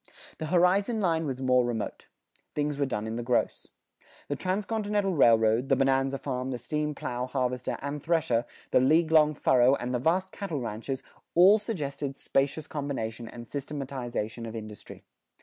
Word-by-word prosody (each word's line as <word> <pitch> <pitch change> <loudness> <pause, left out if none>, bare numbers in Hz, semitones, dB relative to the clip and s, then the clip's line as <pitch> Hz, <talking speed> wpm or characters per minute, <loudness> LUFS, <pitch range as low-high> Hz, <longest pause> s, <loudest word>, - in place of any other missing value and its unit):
The 155 - -3
horizon 185 +6 +3
line 165 -5 +1
was 130 -1 -4
more 125 -1 +4
remote. 120 -3 -4 0.5
Things 145 -1 -1
were 140 - +1
done 105 -4 -3
in 110 +1 -4
the - - -2
gross. 120 +1 0 0.6
The 145 - 0
transcontinental 205 +2 -1
railroad, 115 -3 +4
the - - +5
bonanza 135 0 +2
farm, 130 -2 -3
the 125 - -2
steam 150 +4 -2
plow, 125 -1 -3
harvester, 125 -1 -2
and 145 +1 -4
thresher, 155 -7 +1 0.3
the - - +5
"league 160 +5 +3
long 155 -1 +5
furrow," 130 -1 +4
and 125 -1 -4
the 125 - +1
vast 185 +7 +1
cattle 175 -8 -4
ranches, 120 +3 -4 0.3
all 190 +5 +7
suggested 145 - -4
spacious 140 +3 0
combination 120 -7 -4
and 120 0 -9
systematization 130 -5 -4
of 110 - -7
industry. 110 -2 -9
135 Hz, 160 wpm, -28 LUFS, 125-160 Hz, 0.6 s, all